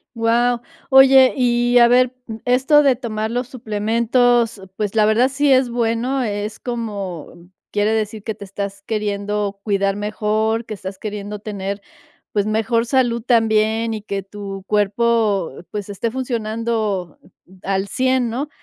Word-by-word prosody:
Wao. 235 +1 +2 0.3
Oye, 265 -1 +7
y, 240 -1 +2
a 240 -1 +7
ver, 250 +1 +3
mm, 220 -2 -7
esto 260 +4 +4
de 275 -3 +4
tomar 220 -3 -3
los 245 +1 -2
suplementos, 235 0 +1
pues, 210 0 -3
la 215 -1 +4
verdad, 225 +4 +3
sí 285 +1 +1
es 260 -1 +3
bueno, 240 +3 0
es 210 -1 -4
como 200 - -6 0.2
quiere 210 +1 +1
decir 215 -1 -2
que 220 - -3
te 205 - -11
estás 200 0 -6
queriendo 205 -1 -2
cuidar 195 -2 0
mejor, 215 +2 -1
que 220 - -6
estás 190 -1 -7
queriendo 210 0 -5
tener, 200 -1 -5 0.5
pues 205 -1 +1
mejor 225 +2 +1
salud 240 -2 +1
también, 225 -1 +2
y 215 - -5
que 200 -2 -4
tu 195 0 -8
cuerpo, 210 -2 +1 0.2
pues 205 -1 -5
esté 205 +3 -2
funcionando 220 - -2 0.4
al 195 0 -1
100 255 +2 +1
¿no? 275 +6 -3
220 Hz, 145 wpm, -20 LUFS, 205-240 Hz, 0.5 s, Oye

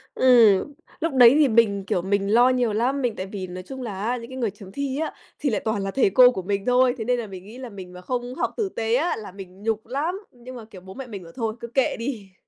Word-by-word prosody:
Ừm, 240 0 +5 0.3
lúc 325 -2 -1
đấy 250 0 +7
thì 295 - +5
mình, 215 -5 +2
kiểu, 180 - 0
mình 200 +2 0
lo 245 +2 +6
nhiều 245 -4 +1
lắm, 260 +6 0
mình 240 -4 -1
tại 185 - -4
vì 190 -2 -6
nói 180 +1 -8
chung 265 +4 -8
là 205 -4 -5
á, 245 +3 0
những 230 0 -9
cái 260 - -8
người 230 -6 -1
chấm 195 -1 -13
thi 280 +1 -3
á, 320 - -2 0.3
thì 290 - 0
lại 215 - -1
toàn 220 -3 -1
là 195 - -3
thầy 245 -5 +3
cô 250 +4 +7
của 190 - -4
mình 200 +2 -2
thôi, 250 0 +4
thế 220 - -4
nên 250 0 +1
là 225 - -5
mình 185 -2 -9
nghĩ 220 +4 -11
là 255 -2 -7
mình 185 -3 -10
mà 180 - -10
không 245 +4 -4
học - - -2
tử 415 -4 -1
tế 225 -6 -1
á, 325 +7 +1
là 210 -4 -8
mình 190 0 -12
nhục 220 -1 -1
lắm, 315 +9 -2
nhưng 250 +1 -12
mà 230 - -9
kiểu 195 -4 -13
bố 190 +1 -11
mẹ 265 +2 -8
mình 200 -6 -8
bảo 165 - -13
thôi, 225 -2 -2
cứ 235 - -7
kệ 260 +2 +1
đi. 225 -6 -5
230 Hz, 290 wpm, -24 LUFS, 200-255 Hz, 0.3 s, đấy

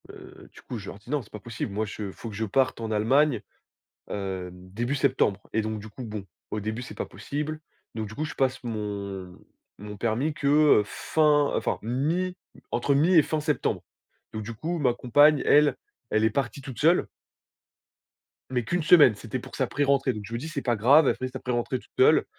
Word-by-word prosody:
Heu, - - -13
du - - -14
coup, 125 - -6
je 100 - -8
leur 100 - -9
dis: 110 - -18
«Non 145 0 0
c'est 105 - -17
pas 105 - -7
possible, 115 -1 -5
moi 110 +2 -1
je 105 -1 -6
faut 115 - -8
que 105 - -8
je 110 +2 -1
parte 130 +3 +1
en 110 -1 -3
Allemagne, 120 +4 +3 0.7
heu, 95 -2 -4
début 95 +9 -4
septembre,» 130 -8 +1
et 110 - +1
donc 110 0 -3
du 110 - -9
coup 125 +4 -9
bon, 105 -3 -6 0.3
au 110 - -2
début 110 +3 -4
c'est 125 - -9
pas - - -3
possible, 150 +2 -5 0.3
donc 110 -2 -4
du 110 - -10
coup, 155 - -2
je - - -7
passe 135 0 0
mon 100 -5 -5 0.4
mon 105 0 -8
permis 120 +8 -1
que, 145 - -4 0.3
heu, - - +1
fin 150 +5 +2
enfin - - 0
mi 160 - -1 0.4
entre 120 +4 +1
mi 160 +7 +4
et 160 - +8
fin 155 +1 -2
septembre, 150 -1 -1 0.5
donc 110 - -4
du 115 +2 -6
coup 165 +9 -3
ma 130 -5 +3
compagne 145 +4 +4
elle, 150 0 +5 0.3
elle 110 0 +2
est 110 - +4
partie 135 +3 -2
toute 135 -3 -8
seule 165 +4 +4 1.4
mais 125 -2 -1
qu'une 175 +8 -1
semaine, 150 -8 +7
c'était 115 +4 -5
pour - - -10
sa - - 0
pré-rentrée, 140 -2 +1
donc 105 -2 -7
je 115 - -9
me - - -1
dis, 155 +7 -6
c'est 150 -3 -3
pas 120 -3 +1
grave, 135 +8 +6
elle - - +3
fait 130 - -4
sa - - -7
pré-rentrée 125 +1 -2
toute - - -22
seule. - - +5
120 Hz, 215 wpm, -26 LUFS, 105-145 Hz, 1.4 s, et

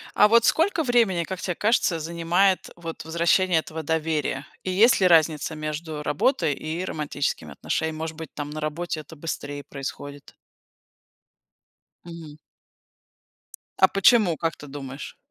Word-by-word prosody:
А 210 - +6
вот 230 +1 +5
сколько 330 0 +2
времени, 230 - +2
как 190 +1 -6
те 180 - -2
кажется, 205 -5 +1
занимает 170 +4 +1
вот 165 -2 -7
возвращение 170 +2 +2
этого 160 0 -7
доверия? 155 -3 -1 0.2
И 185 - -2
есть 215 +6 +5
ли 185 - +5
разница 160 -2 +3
между 155 0 -5
работой 150 - +1
и 160 +6 -4
романтическими 145 - -3
отношениями? 160 - -2
Может 160 0 -5
быть, 160 -3 -9
там, 145 0 -5
на 155 +1 -5
работе 155 +2 -3
это 155 +2 -12
быстрее 145 -2 -5
происходит? 140 +1 -8 1.7
Мгм. 165 -3 -10 1.4
А - - +6
почему, 195 -4 +4
как 165 0 -2
ты 145 - -11
думаешь? 135 0 -8
160 Hz, 135 wpm, -24 LUFS, 150-180 Hz, 1.7 s, А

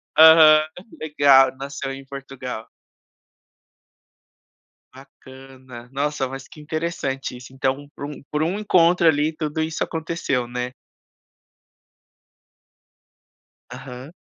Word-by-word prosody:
Aham. 155 -1 +8 0.4
Legal, 140 -4 +4
nasceu 140 0 -5
em 135 0 -9
Portugal. 135 -4 -8 2.3
Bacana. 130 -2 -14
Nossa, 140 0 -2
mas 135 +1 -9
que - - -15
interessante 150 -4 -4
isso. 125 +1 -13
Então, 135 +2 -2
por - - -6
um 145 -1 -9
por 150 +1 0
um 175 +5 -1
encontro 175 -4 +3
ali, 155 0 +2
tudo 155 0 -3
isso 160 0 -2
aconteceu, 160 -6 -3
né? 125 +1 -4 3.0
Aham. 130 +2 -10
140 Hz, 95 wpm, -22 LUFS, 130-155 Hz, 3.0 s, Aham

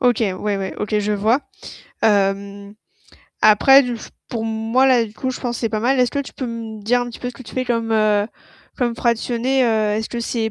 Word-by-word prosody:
OK, 245 -3 +3
ouais 200 +2 -2
ouais, 190 -1 -4
OK, 210 0 -1
je 210 0 -1
vois. 220 +7 +2 0.6
Hem, 200 0 0 0.7
après 270 +6 +7
du 245 -2 -3
f - - -11 0.2
pour 225 -2 -3
moi 225 +4 +1
là, 250 -3 +4
du 210 - -10
coup, 260 +3 -3
je - - -6
pense 240 -2 -2
que - - -7
c'est 230 - 0
pas 215 -1 -2
mal. 260 +3 +2
Est-ce 250 -1 +3
que 280 - -1
tu 280 - -8
peux 260 - -5
me 225 -2 -6
dire 245 +4 +2
un 245 - -3
petit 235 - -10
peu 245 - -4
ce 250 - -8
que 255 - -11
tu - - -12
fais 255 - -1
comme, 230 -2 -1
heu, 210 -1 +2 0.5
comme 240 -3 0
fractionné? 240 +3 +1
Heu, 215 -2 +1
est-ce 220 0 -3
que 240 - -4
c'est 230 -1 -2
230 Hz, 240 wpm, -20 LUFS, 215-245 Hz, 0.7 s, après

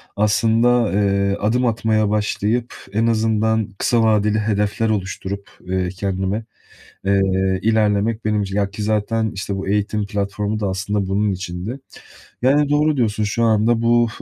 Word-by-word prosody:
aslında, 115 +3 +2
eee, 100 -1 +1
adım 120 +5 +1
atmaya 110 -2 +1
başlayıp 105 +3 -1 0.2
en 115 +2 +2
azından 110 -1 +1
kısa 115 +2 +2
vadeli 105 -1 +2
hedefler 105 +1 0
oluşturup, 100 -1 -3 0.2
ııı, 95 -1 0
kendime, 95 +3 -2 0.6
eee, 100 0 +3 0.4
ilerlemek 110 0 +1
benim 105 -1 +1
için 95 0 -4
Ya 100 -1 0
ki 105 +1 -6
zaten, 110 +1 0
işte, 100 0 -4
bu 95 0 -5
eğitim 105 0 0
platformu 100 +1 -2
da 100 - 0
aslında 100 +1 -2
bunun 100 +1 +1
içindi. 95 +7 -5 0.6
Yani, 140 +3 +3
doğru 150 0 +2
diyorsun. 110 -3 0
Şu 110 +3 -1
anda 115 +1 +2
bu 120 0 +3
105 Hz, 145 wpm, -20 LUFS, 100-115 Hz, 0.6 s, eee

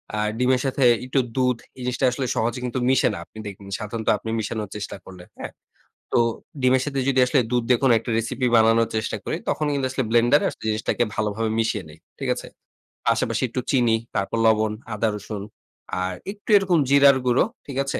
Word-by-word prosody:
আ - - -1 0.2
ডিমের 125 0 +3
সাথে 135 0 0 0.2
একটু 130 +2 +1 0.2
দুধ 125 -2 +2 0.2
এই - - -9
জিনিসটা 125 +2 0
আসলে 130 +2 -2
সহজে 120 +3 -1
কিন্তু 125 +1 -2
মিশে 130 - +4
না - - -5
আপনি - - -18
দেখবেন 100 0 -9
সাধারণত 110 +1 -5
আপনি 110 - -7
মিশানোর 110 -1 -3
চেষ্টা 105 0 -5
করলে, 95 -2 -11 0.2
হ্যাঁ? - - -6 0.6
তো - - +4 0.4
ডিমের 130 0 +4
সাথে 140 -2 -1
যদি 130 -1 +3
আসলে 130 +2 +3
দুধ 125 -1 +1
দেখুন 125 +2 +3
একটা 115 - -6
রেসিপি 125 +3 -1
বানানোর 115 0 +4
চেষ্টা 110 - -2
করি। - - -2
তখন 150 - 0
কিন্তু 140 -2 0
আসলে 130 0 -1
ব্লেন্ডারে 120 +5 +4
আসলে - - -13
জিনিসটাকে 110 +2 0
ভালোভাবে 110 +1 -1
মিশিয়ে 110 -3 0
নেই, 75 +1 -14 0.2
ঠিক - - -4
আছে? - - -8 0.6
পাশাপাশি - - +1
একটু 125 +3 -3
চিনি, 120 -4 +3 0.2
তারপর 100 +3 -1
লবণ, 110 -1 +3 0.2
আদা 105 +2 0
রসুন 105 -1 -6 0.6
আর 95 0 -2 0.2
একটু 205 +2 -14
এরকম 185 -4 +2
জিরার 140 -1 +6
গুঁড়ো, 125 0 +4 0.2
ঠিক 135 -2 -7
আছে? 135 - -3
120 Hz, 190 wpm, -23 LUFS, 110-130 Hz, 0.6 s, জিরার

